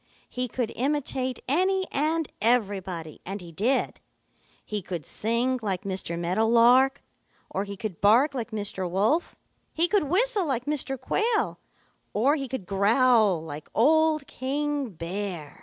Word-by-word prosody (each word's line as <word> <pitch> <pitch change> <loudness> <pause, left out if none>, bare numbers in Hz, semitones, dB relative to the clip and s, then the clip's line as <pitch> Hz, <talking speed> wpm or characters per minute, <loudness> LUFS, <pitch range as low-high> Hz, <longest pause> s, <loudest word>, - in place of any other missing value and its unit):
He 250 0 -2
could 240 -1 -3
imitate 260 -2 -1
any 375 +7 +2
and 310 +2 0
everybody, 195 -8 0
and 195 +3 -5
he 175 -2 -11
did. 230 - 0 0.7
He 210 -1 -3
could 175 -4 -6
sing 240 +4 -1
like 195 -4 -2
Mr. 190 -3 -3
Meadow 180 +6 +1
Lark, 250 +4 +5 0.5
or 195 +2 -2
he 200 0 -7
could 195 -4 -5
bark 240 +9 +5
like 245 -3 -4
Mr. 205 -4 -3
Wolf. 215 - +1 0.4
He 335 +2 +2
could 405 -4 +2
whistle 400 - +1
like 255 -3 -1
Mr. 275 -3 -2
Quail, 435 - 0 0.6
or 265 +8 +3
he 275 -3 -3
could 245 -6 -5
growl 210 -2 +3
like 150 -1 -8
old 310 +4 +3
King 285 0 -2
Bear. 175 -3 -6
235 Hz, 140 wpm, -26 LUFS, 195-285 Hz, 0.7 s, Lark